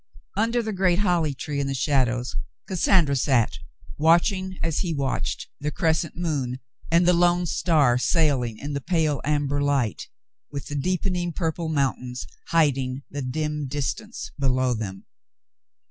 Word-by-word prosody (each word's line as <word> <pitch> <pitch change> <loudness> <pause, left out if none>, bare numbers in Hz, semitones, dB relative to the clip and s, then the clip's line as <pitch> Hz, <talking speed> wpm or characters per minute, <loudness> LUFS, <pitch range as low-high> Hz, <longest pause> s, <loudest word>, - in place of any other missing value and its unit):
Under 230 +3 +1
the 220 -1 -3
great 185 -2 +2
holly 175 -7 +1
tree 145 +2 -4
in 140 - 0
the 135 - -2
shadows 125 - +1 0.3
Cassandra 175 -5 +3
sat, 120 - +2 0.4
watching, 185 +4 +3
as 165 -2 0
he 170 -4 -1
watched, 135 -2 -2
the 145 +1 -1
crescent 160 +1 0
moon 140 -7 -2 0.3
and 170 +1 +4
the 180 - +6
lone 175 0 +3
star 150 -7 +3
sailing 130 -7 +2
in 145 +4 -5
the 140 - -2
pale 155 -2 +1
amber 145 -1 0
light, 140 -7 0 0.4
with 140 -2 -5
the 145 - -5
deepen 180 +5 0
ing 175 -1 -2
purple 165 0 -2
mountain 135 -4 -1 0.3
hiding 135 -5 +1
the 145 - -4
dim 150 +2 -2
distance 150 - -4
below 130 -2 +2
them. 100 -4 -5
150 Hz, 145 wpm, -25 LUFS, 135-175 Hz, 0.4 s, the